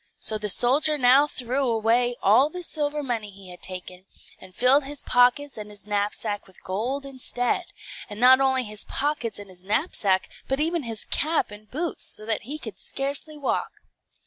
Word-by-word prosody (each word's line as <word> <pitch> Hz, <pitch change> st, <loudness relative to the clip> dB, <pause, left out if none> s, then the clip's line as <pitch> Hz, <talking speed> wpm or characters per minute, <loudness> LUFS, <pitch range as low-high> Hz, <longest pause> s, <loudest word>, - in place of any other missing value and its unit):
So 215 Hz, -1 st, +2 dB
the 210 Hz, 0 st, -3 dB
soldier 280 Hz, +9 st, +4 dB
now 265 Hz, +2 st, +5 dB
threw 260 Hz, 0 st, -2 dB
away 235 Hz, +2 st, +2 dB
all 240 Hz, +9 st, +5 dB
the 360 Hz, +2 st, -7 dB
silver 295 Hz, -2 st, -2 dB
money 230 Hz, -5 st, -2 dB
he 195 Hz, -1 st, -12 dB
had 180 Hz, -, -12 dB
taken, 185 Hz, 0 st, -6 dB, 0.3 s
and 185 Hz, -1 st, -15 dB
filled 265 Hz, +4 st, +6 dB
his 290 Hz, 0 st, -4 dB
pockets 250 Hz, +2 st, +2 dB
and 210 Hz, 0 st, -7 dB
his 205 Hz, -2 st, -9 dB
knapsack 205 Hz, 0 st, -2 dB
with 190 Hz, -, -19 dB
gold 245 Hz, +9 st, -3 dB
instead; 260 Hz, +3 st, -2 dB, 0.4 s
and 205 Hz, 0 st, -8 dB
not 255 Hz, +2 st, +7 dB
only 265 Hz, -1 st, +2 dB
his 210 Hz, -2 st, -4 dB
pockets 285 Hz, -6 st, -2 dB
and 205 Hz, -1 st, -9 dB
his 180 Hz, -1 st, -13 dB
knapsack, 200 Hz, -, +1 dB, 0.2 s
but 270 Hz, +1 st, -1 dB
even 330 Hz, +2 st, 0 dB
his 225 Hz, -5 st, -6 dB
cap 310 Hz, -6 st, 0 dB
and 210 Hz, +1 st, -12 dB
boots, 325 Hz, +5 st, -2 dB
so 215 Hz, -, -5 dB
that 220 Hz, -1 st, 0 dB
he 300 Hz, -, -3 dB
could 220 Hz, -10 st, -9 dB
scarcely 280 Hz, +3 st, -3 dB
walk. 285 Hz, -, -2 dB
245 Hz, 180 wpm, -25 LUFS, 210-280 Hz, 0.4 s, not